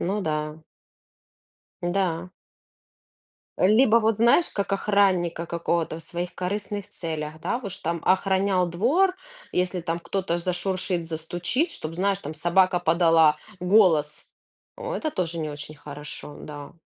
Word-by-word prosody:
Ну 200 +4 -1
да. 155 -1 -2 1.2
Да. 175 -1 -1 1.3
Либо 220 +4 +5
вот 220 -1 +2
знаешь, 235 +10 +4
как 200 0 -2
охранника 185 -5 +1
какого-то 170 -1 -1
в 165 - -9
своих 175 +2 -4
корыстных 205 +2 -3
целях, 155 -2 -4
да 240 - -1
в 255 - -13
уж 195 -2 -4
там 170 0 -3
охранял 190 0 +2
двор, 270 - +2 0.4
если 180 0 0
там 165 0 -2
кто-то 180 0 -2
зашуршит, 180 0 -2
застучит, 175 - -1
чтоб 155 - -6
знаешь 195 +2 +1
там 155 -3 -7
собака 180 +3 +3
подала 165 -2 +4 0.2
голос. 180 -6 +3 0.5
О, 485 +1 -4
это 315 -9 -2
тоже 170 - -2
не 155 -1 -2
очень 150 +1 -8
хорошо, 150 0 -8
да. 145 +2 -9
175 Hz, 130 wpm, -25 LUFS, 165-195 Hz, 1.3 s, Либо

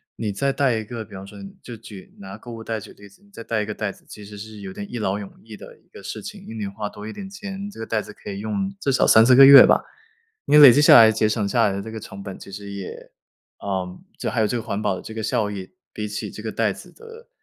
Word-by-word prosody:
你 110 -2 -3
再 140 +8 -1
带 135 -4 +1
一 110 - -4
个， 115 0 -7
比 - - -18
方 95 0 -9
说 - - -13 0.2
就 120 -2 -9
举 105 -3 -13
拿 100 +1 -10
购 120 - -11
物 115 -1 -8
袋 115 -1 -3
举 - - -12
例 100 - -15
子， 100 - -23
你 205 - -24
再 200 - -11
带 110 -1 -1
一 - - -3
个 105 - -4
袋 105 -2 -3
子， - - -20
其 105 - -11
实 105 +1 -11
是 110 0 -10
有 95 -1 -8
点 100 +1 -8
一 120 - -5
劳 100 -2 -2
永 100 -2 -9
逸 110 -1 -11
的 - - -13
一 - - -33
个 - - -13
事 - - -7
情， - - -9
宁 110 - -8
愿 100 -2 -4
花 105 +1 -5
多 105 +1 -10
一 110 - -7
点 195 -1 -8
钱， 200 0 -7
这 205 - -13
个 115 - -5
袋 110 -1 -1
子 - - -11
可 - - -9
以 100 - -6
用 195 - -3
至 140 - 0
少 130 - +3
3-4 115 +3 +6
个 135 +1 +9
月 140 0 +11
吧， - - +3 0.6
你 150 - +5
累 145 -3 +11
积 145 +5 +4
下 - - +8
来 115 -1 +9
节 110 0 +1
省 110 -1 -1
下 115 +2 +2
来 100 - 0
的 100 - -4
这 110 +3 -8
个 110 - -7
成 100 -2 -10
本 95 -1 -8
其 100 - -12
实 100 +1 -8
也 100 -2 -9 0.5
呃， 95 -2 -4 0.2
就 - - -3
还 - - 0
有 - - +2
这 105 - -3
个 - - -5
环 110 -3 -4
保 95 - 0
的 - - -8
这 110 - -10
个 110 - -4
效 105 -1 -1
益 95 -2 -7 0.2
比 105 - -4
起 105 0 -5
这 - - -10
个 - - -4
袋 - - 0
子 - - -13
的， 460 +1 -14
110 Hz, 325 characters per minute, -22 LUFS, 100-120 Hz, 0.6 s, 月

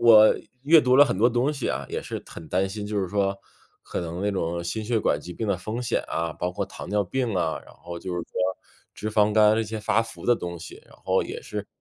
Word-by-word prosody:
我 110 -2 +8 0.3
阅 155 +3 +7
读 130 -2 +4
了 145 - +9
很 95 - -1
多 120 +3 +5
东 125 +5 +1
西 135 -5 -3
啊， - - -2
也 - - -2
是 - - -6
很 80 - -10
担 95 +2 +1
心， 105 +1 -5
就 105 0 -2
是 95 - -1
说 100 0 0 0.5
可 - - -4
能 85 +1 -4
那 105 - +1
种 85 -2 -2
心 110 +6 -2
血 115 0 +1
管 75 -7 +1
疾 90 +3 -8
病 110 - -3
的 100 -3 +1
风 110 +6 -4
险 120 - 0
啊， 85 -1 -1
包 90 - -2
括 90 - -2
糖 - - -9
尿 100 0 +1
病 120 +1 -1
啊， 80 -3 0
然 - - -15
后 85 0 -8
就 90 0 -5
是 90 - -2
说 - - -15 0.6
脂 110 - -4
肪 105 0 +3
肝 105 0 +6
这 115 - +1
些 110 0 -4
发 105 +1 +2
福 115 0 -10
的 120 - +5
东 85 -3 -5
西， 85 - -10
然 - - -18
后 - - +2
也 - - -6
是 105 -1 -5
105 Hz, 280 characters per minute, -25 LUFS, 90-115 Hz, 0.6 s, 了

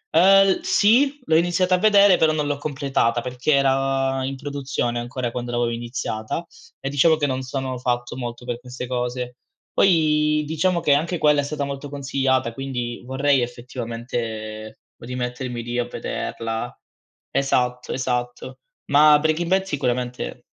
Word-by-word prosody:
Uhm, 165 - +6 0.4
l - - -14
sì, 285 - +3
l'ho 160 - +3
iniziata 175 +2 +2
a - - -3
vedere, 200 -2 +6
però 160 -1 +4
non 150 -1 -1
l'ho 145 0 -1
completata, 135 -5 0
perché 125 +4 -1
era 135 -1 +1
in 135 0 -4
produzione 140 -3 -3
ancora 120 0 -4
quando 120 0 -4
l'avevo 120 0 0
iniziata, 115 +3 -4 0.4
e 135 - -3
diciamo 150 +3 +4
che 150 -2 0
non 130 -2 -2
sono 130 0 -4
fatto 120 -1 -2
molto 120 -1 -6
per 120 -1 -4
queste 125 0 -7
cose. 125 0 -3 0.4
Poi, 150 -4 +3
diciamo 170 +3 +1
che 150 - +2
anche 165 +5 0
quella 150 -1 +4
è - - -5
stata 145 0 -3
molto 140 +1 -5
consigliata, 135 -3 0
quindi 125 -2 -4
vorrei, 135 +1 +2
effettivamente, 115 -3 -5 0.2
rimettermi 125 0 -4
lì 120 +1 -4
a 120 - 0
vederla. 115 -1 -4 0.5
Esatto, 125 -2 0
esatto. 125 0 -3 0.3
Ma 150 +1 +7
Breaking 160 +3 0
Bad 190 +1 +3
sicuramente 125 - -3
130 Hz, 150 wpm, -22 LUFS, 120-150 Hz, 0.5 s, Ma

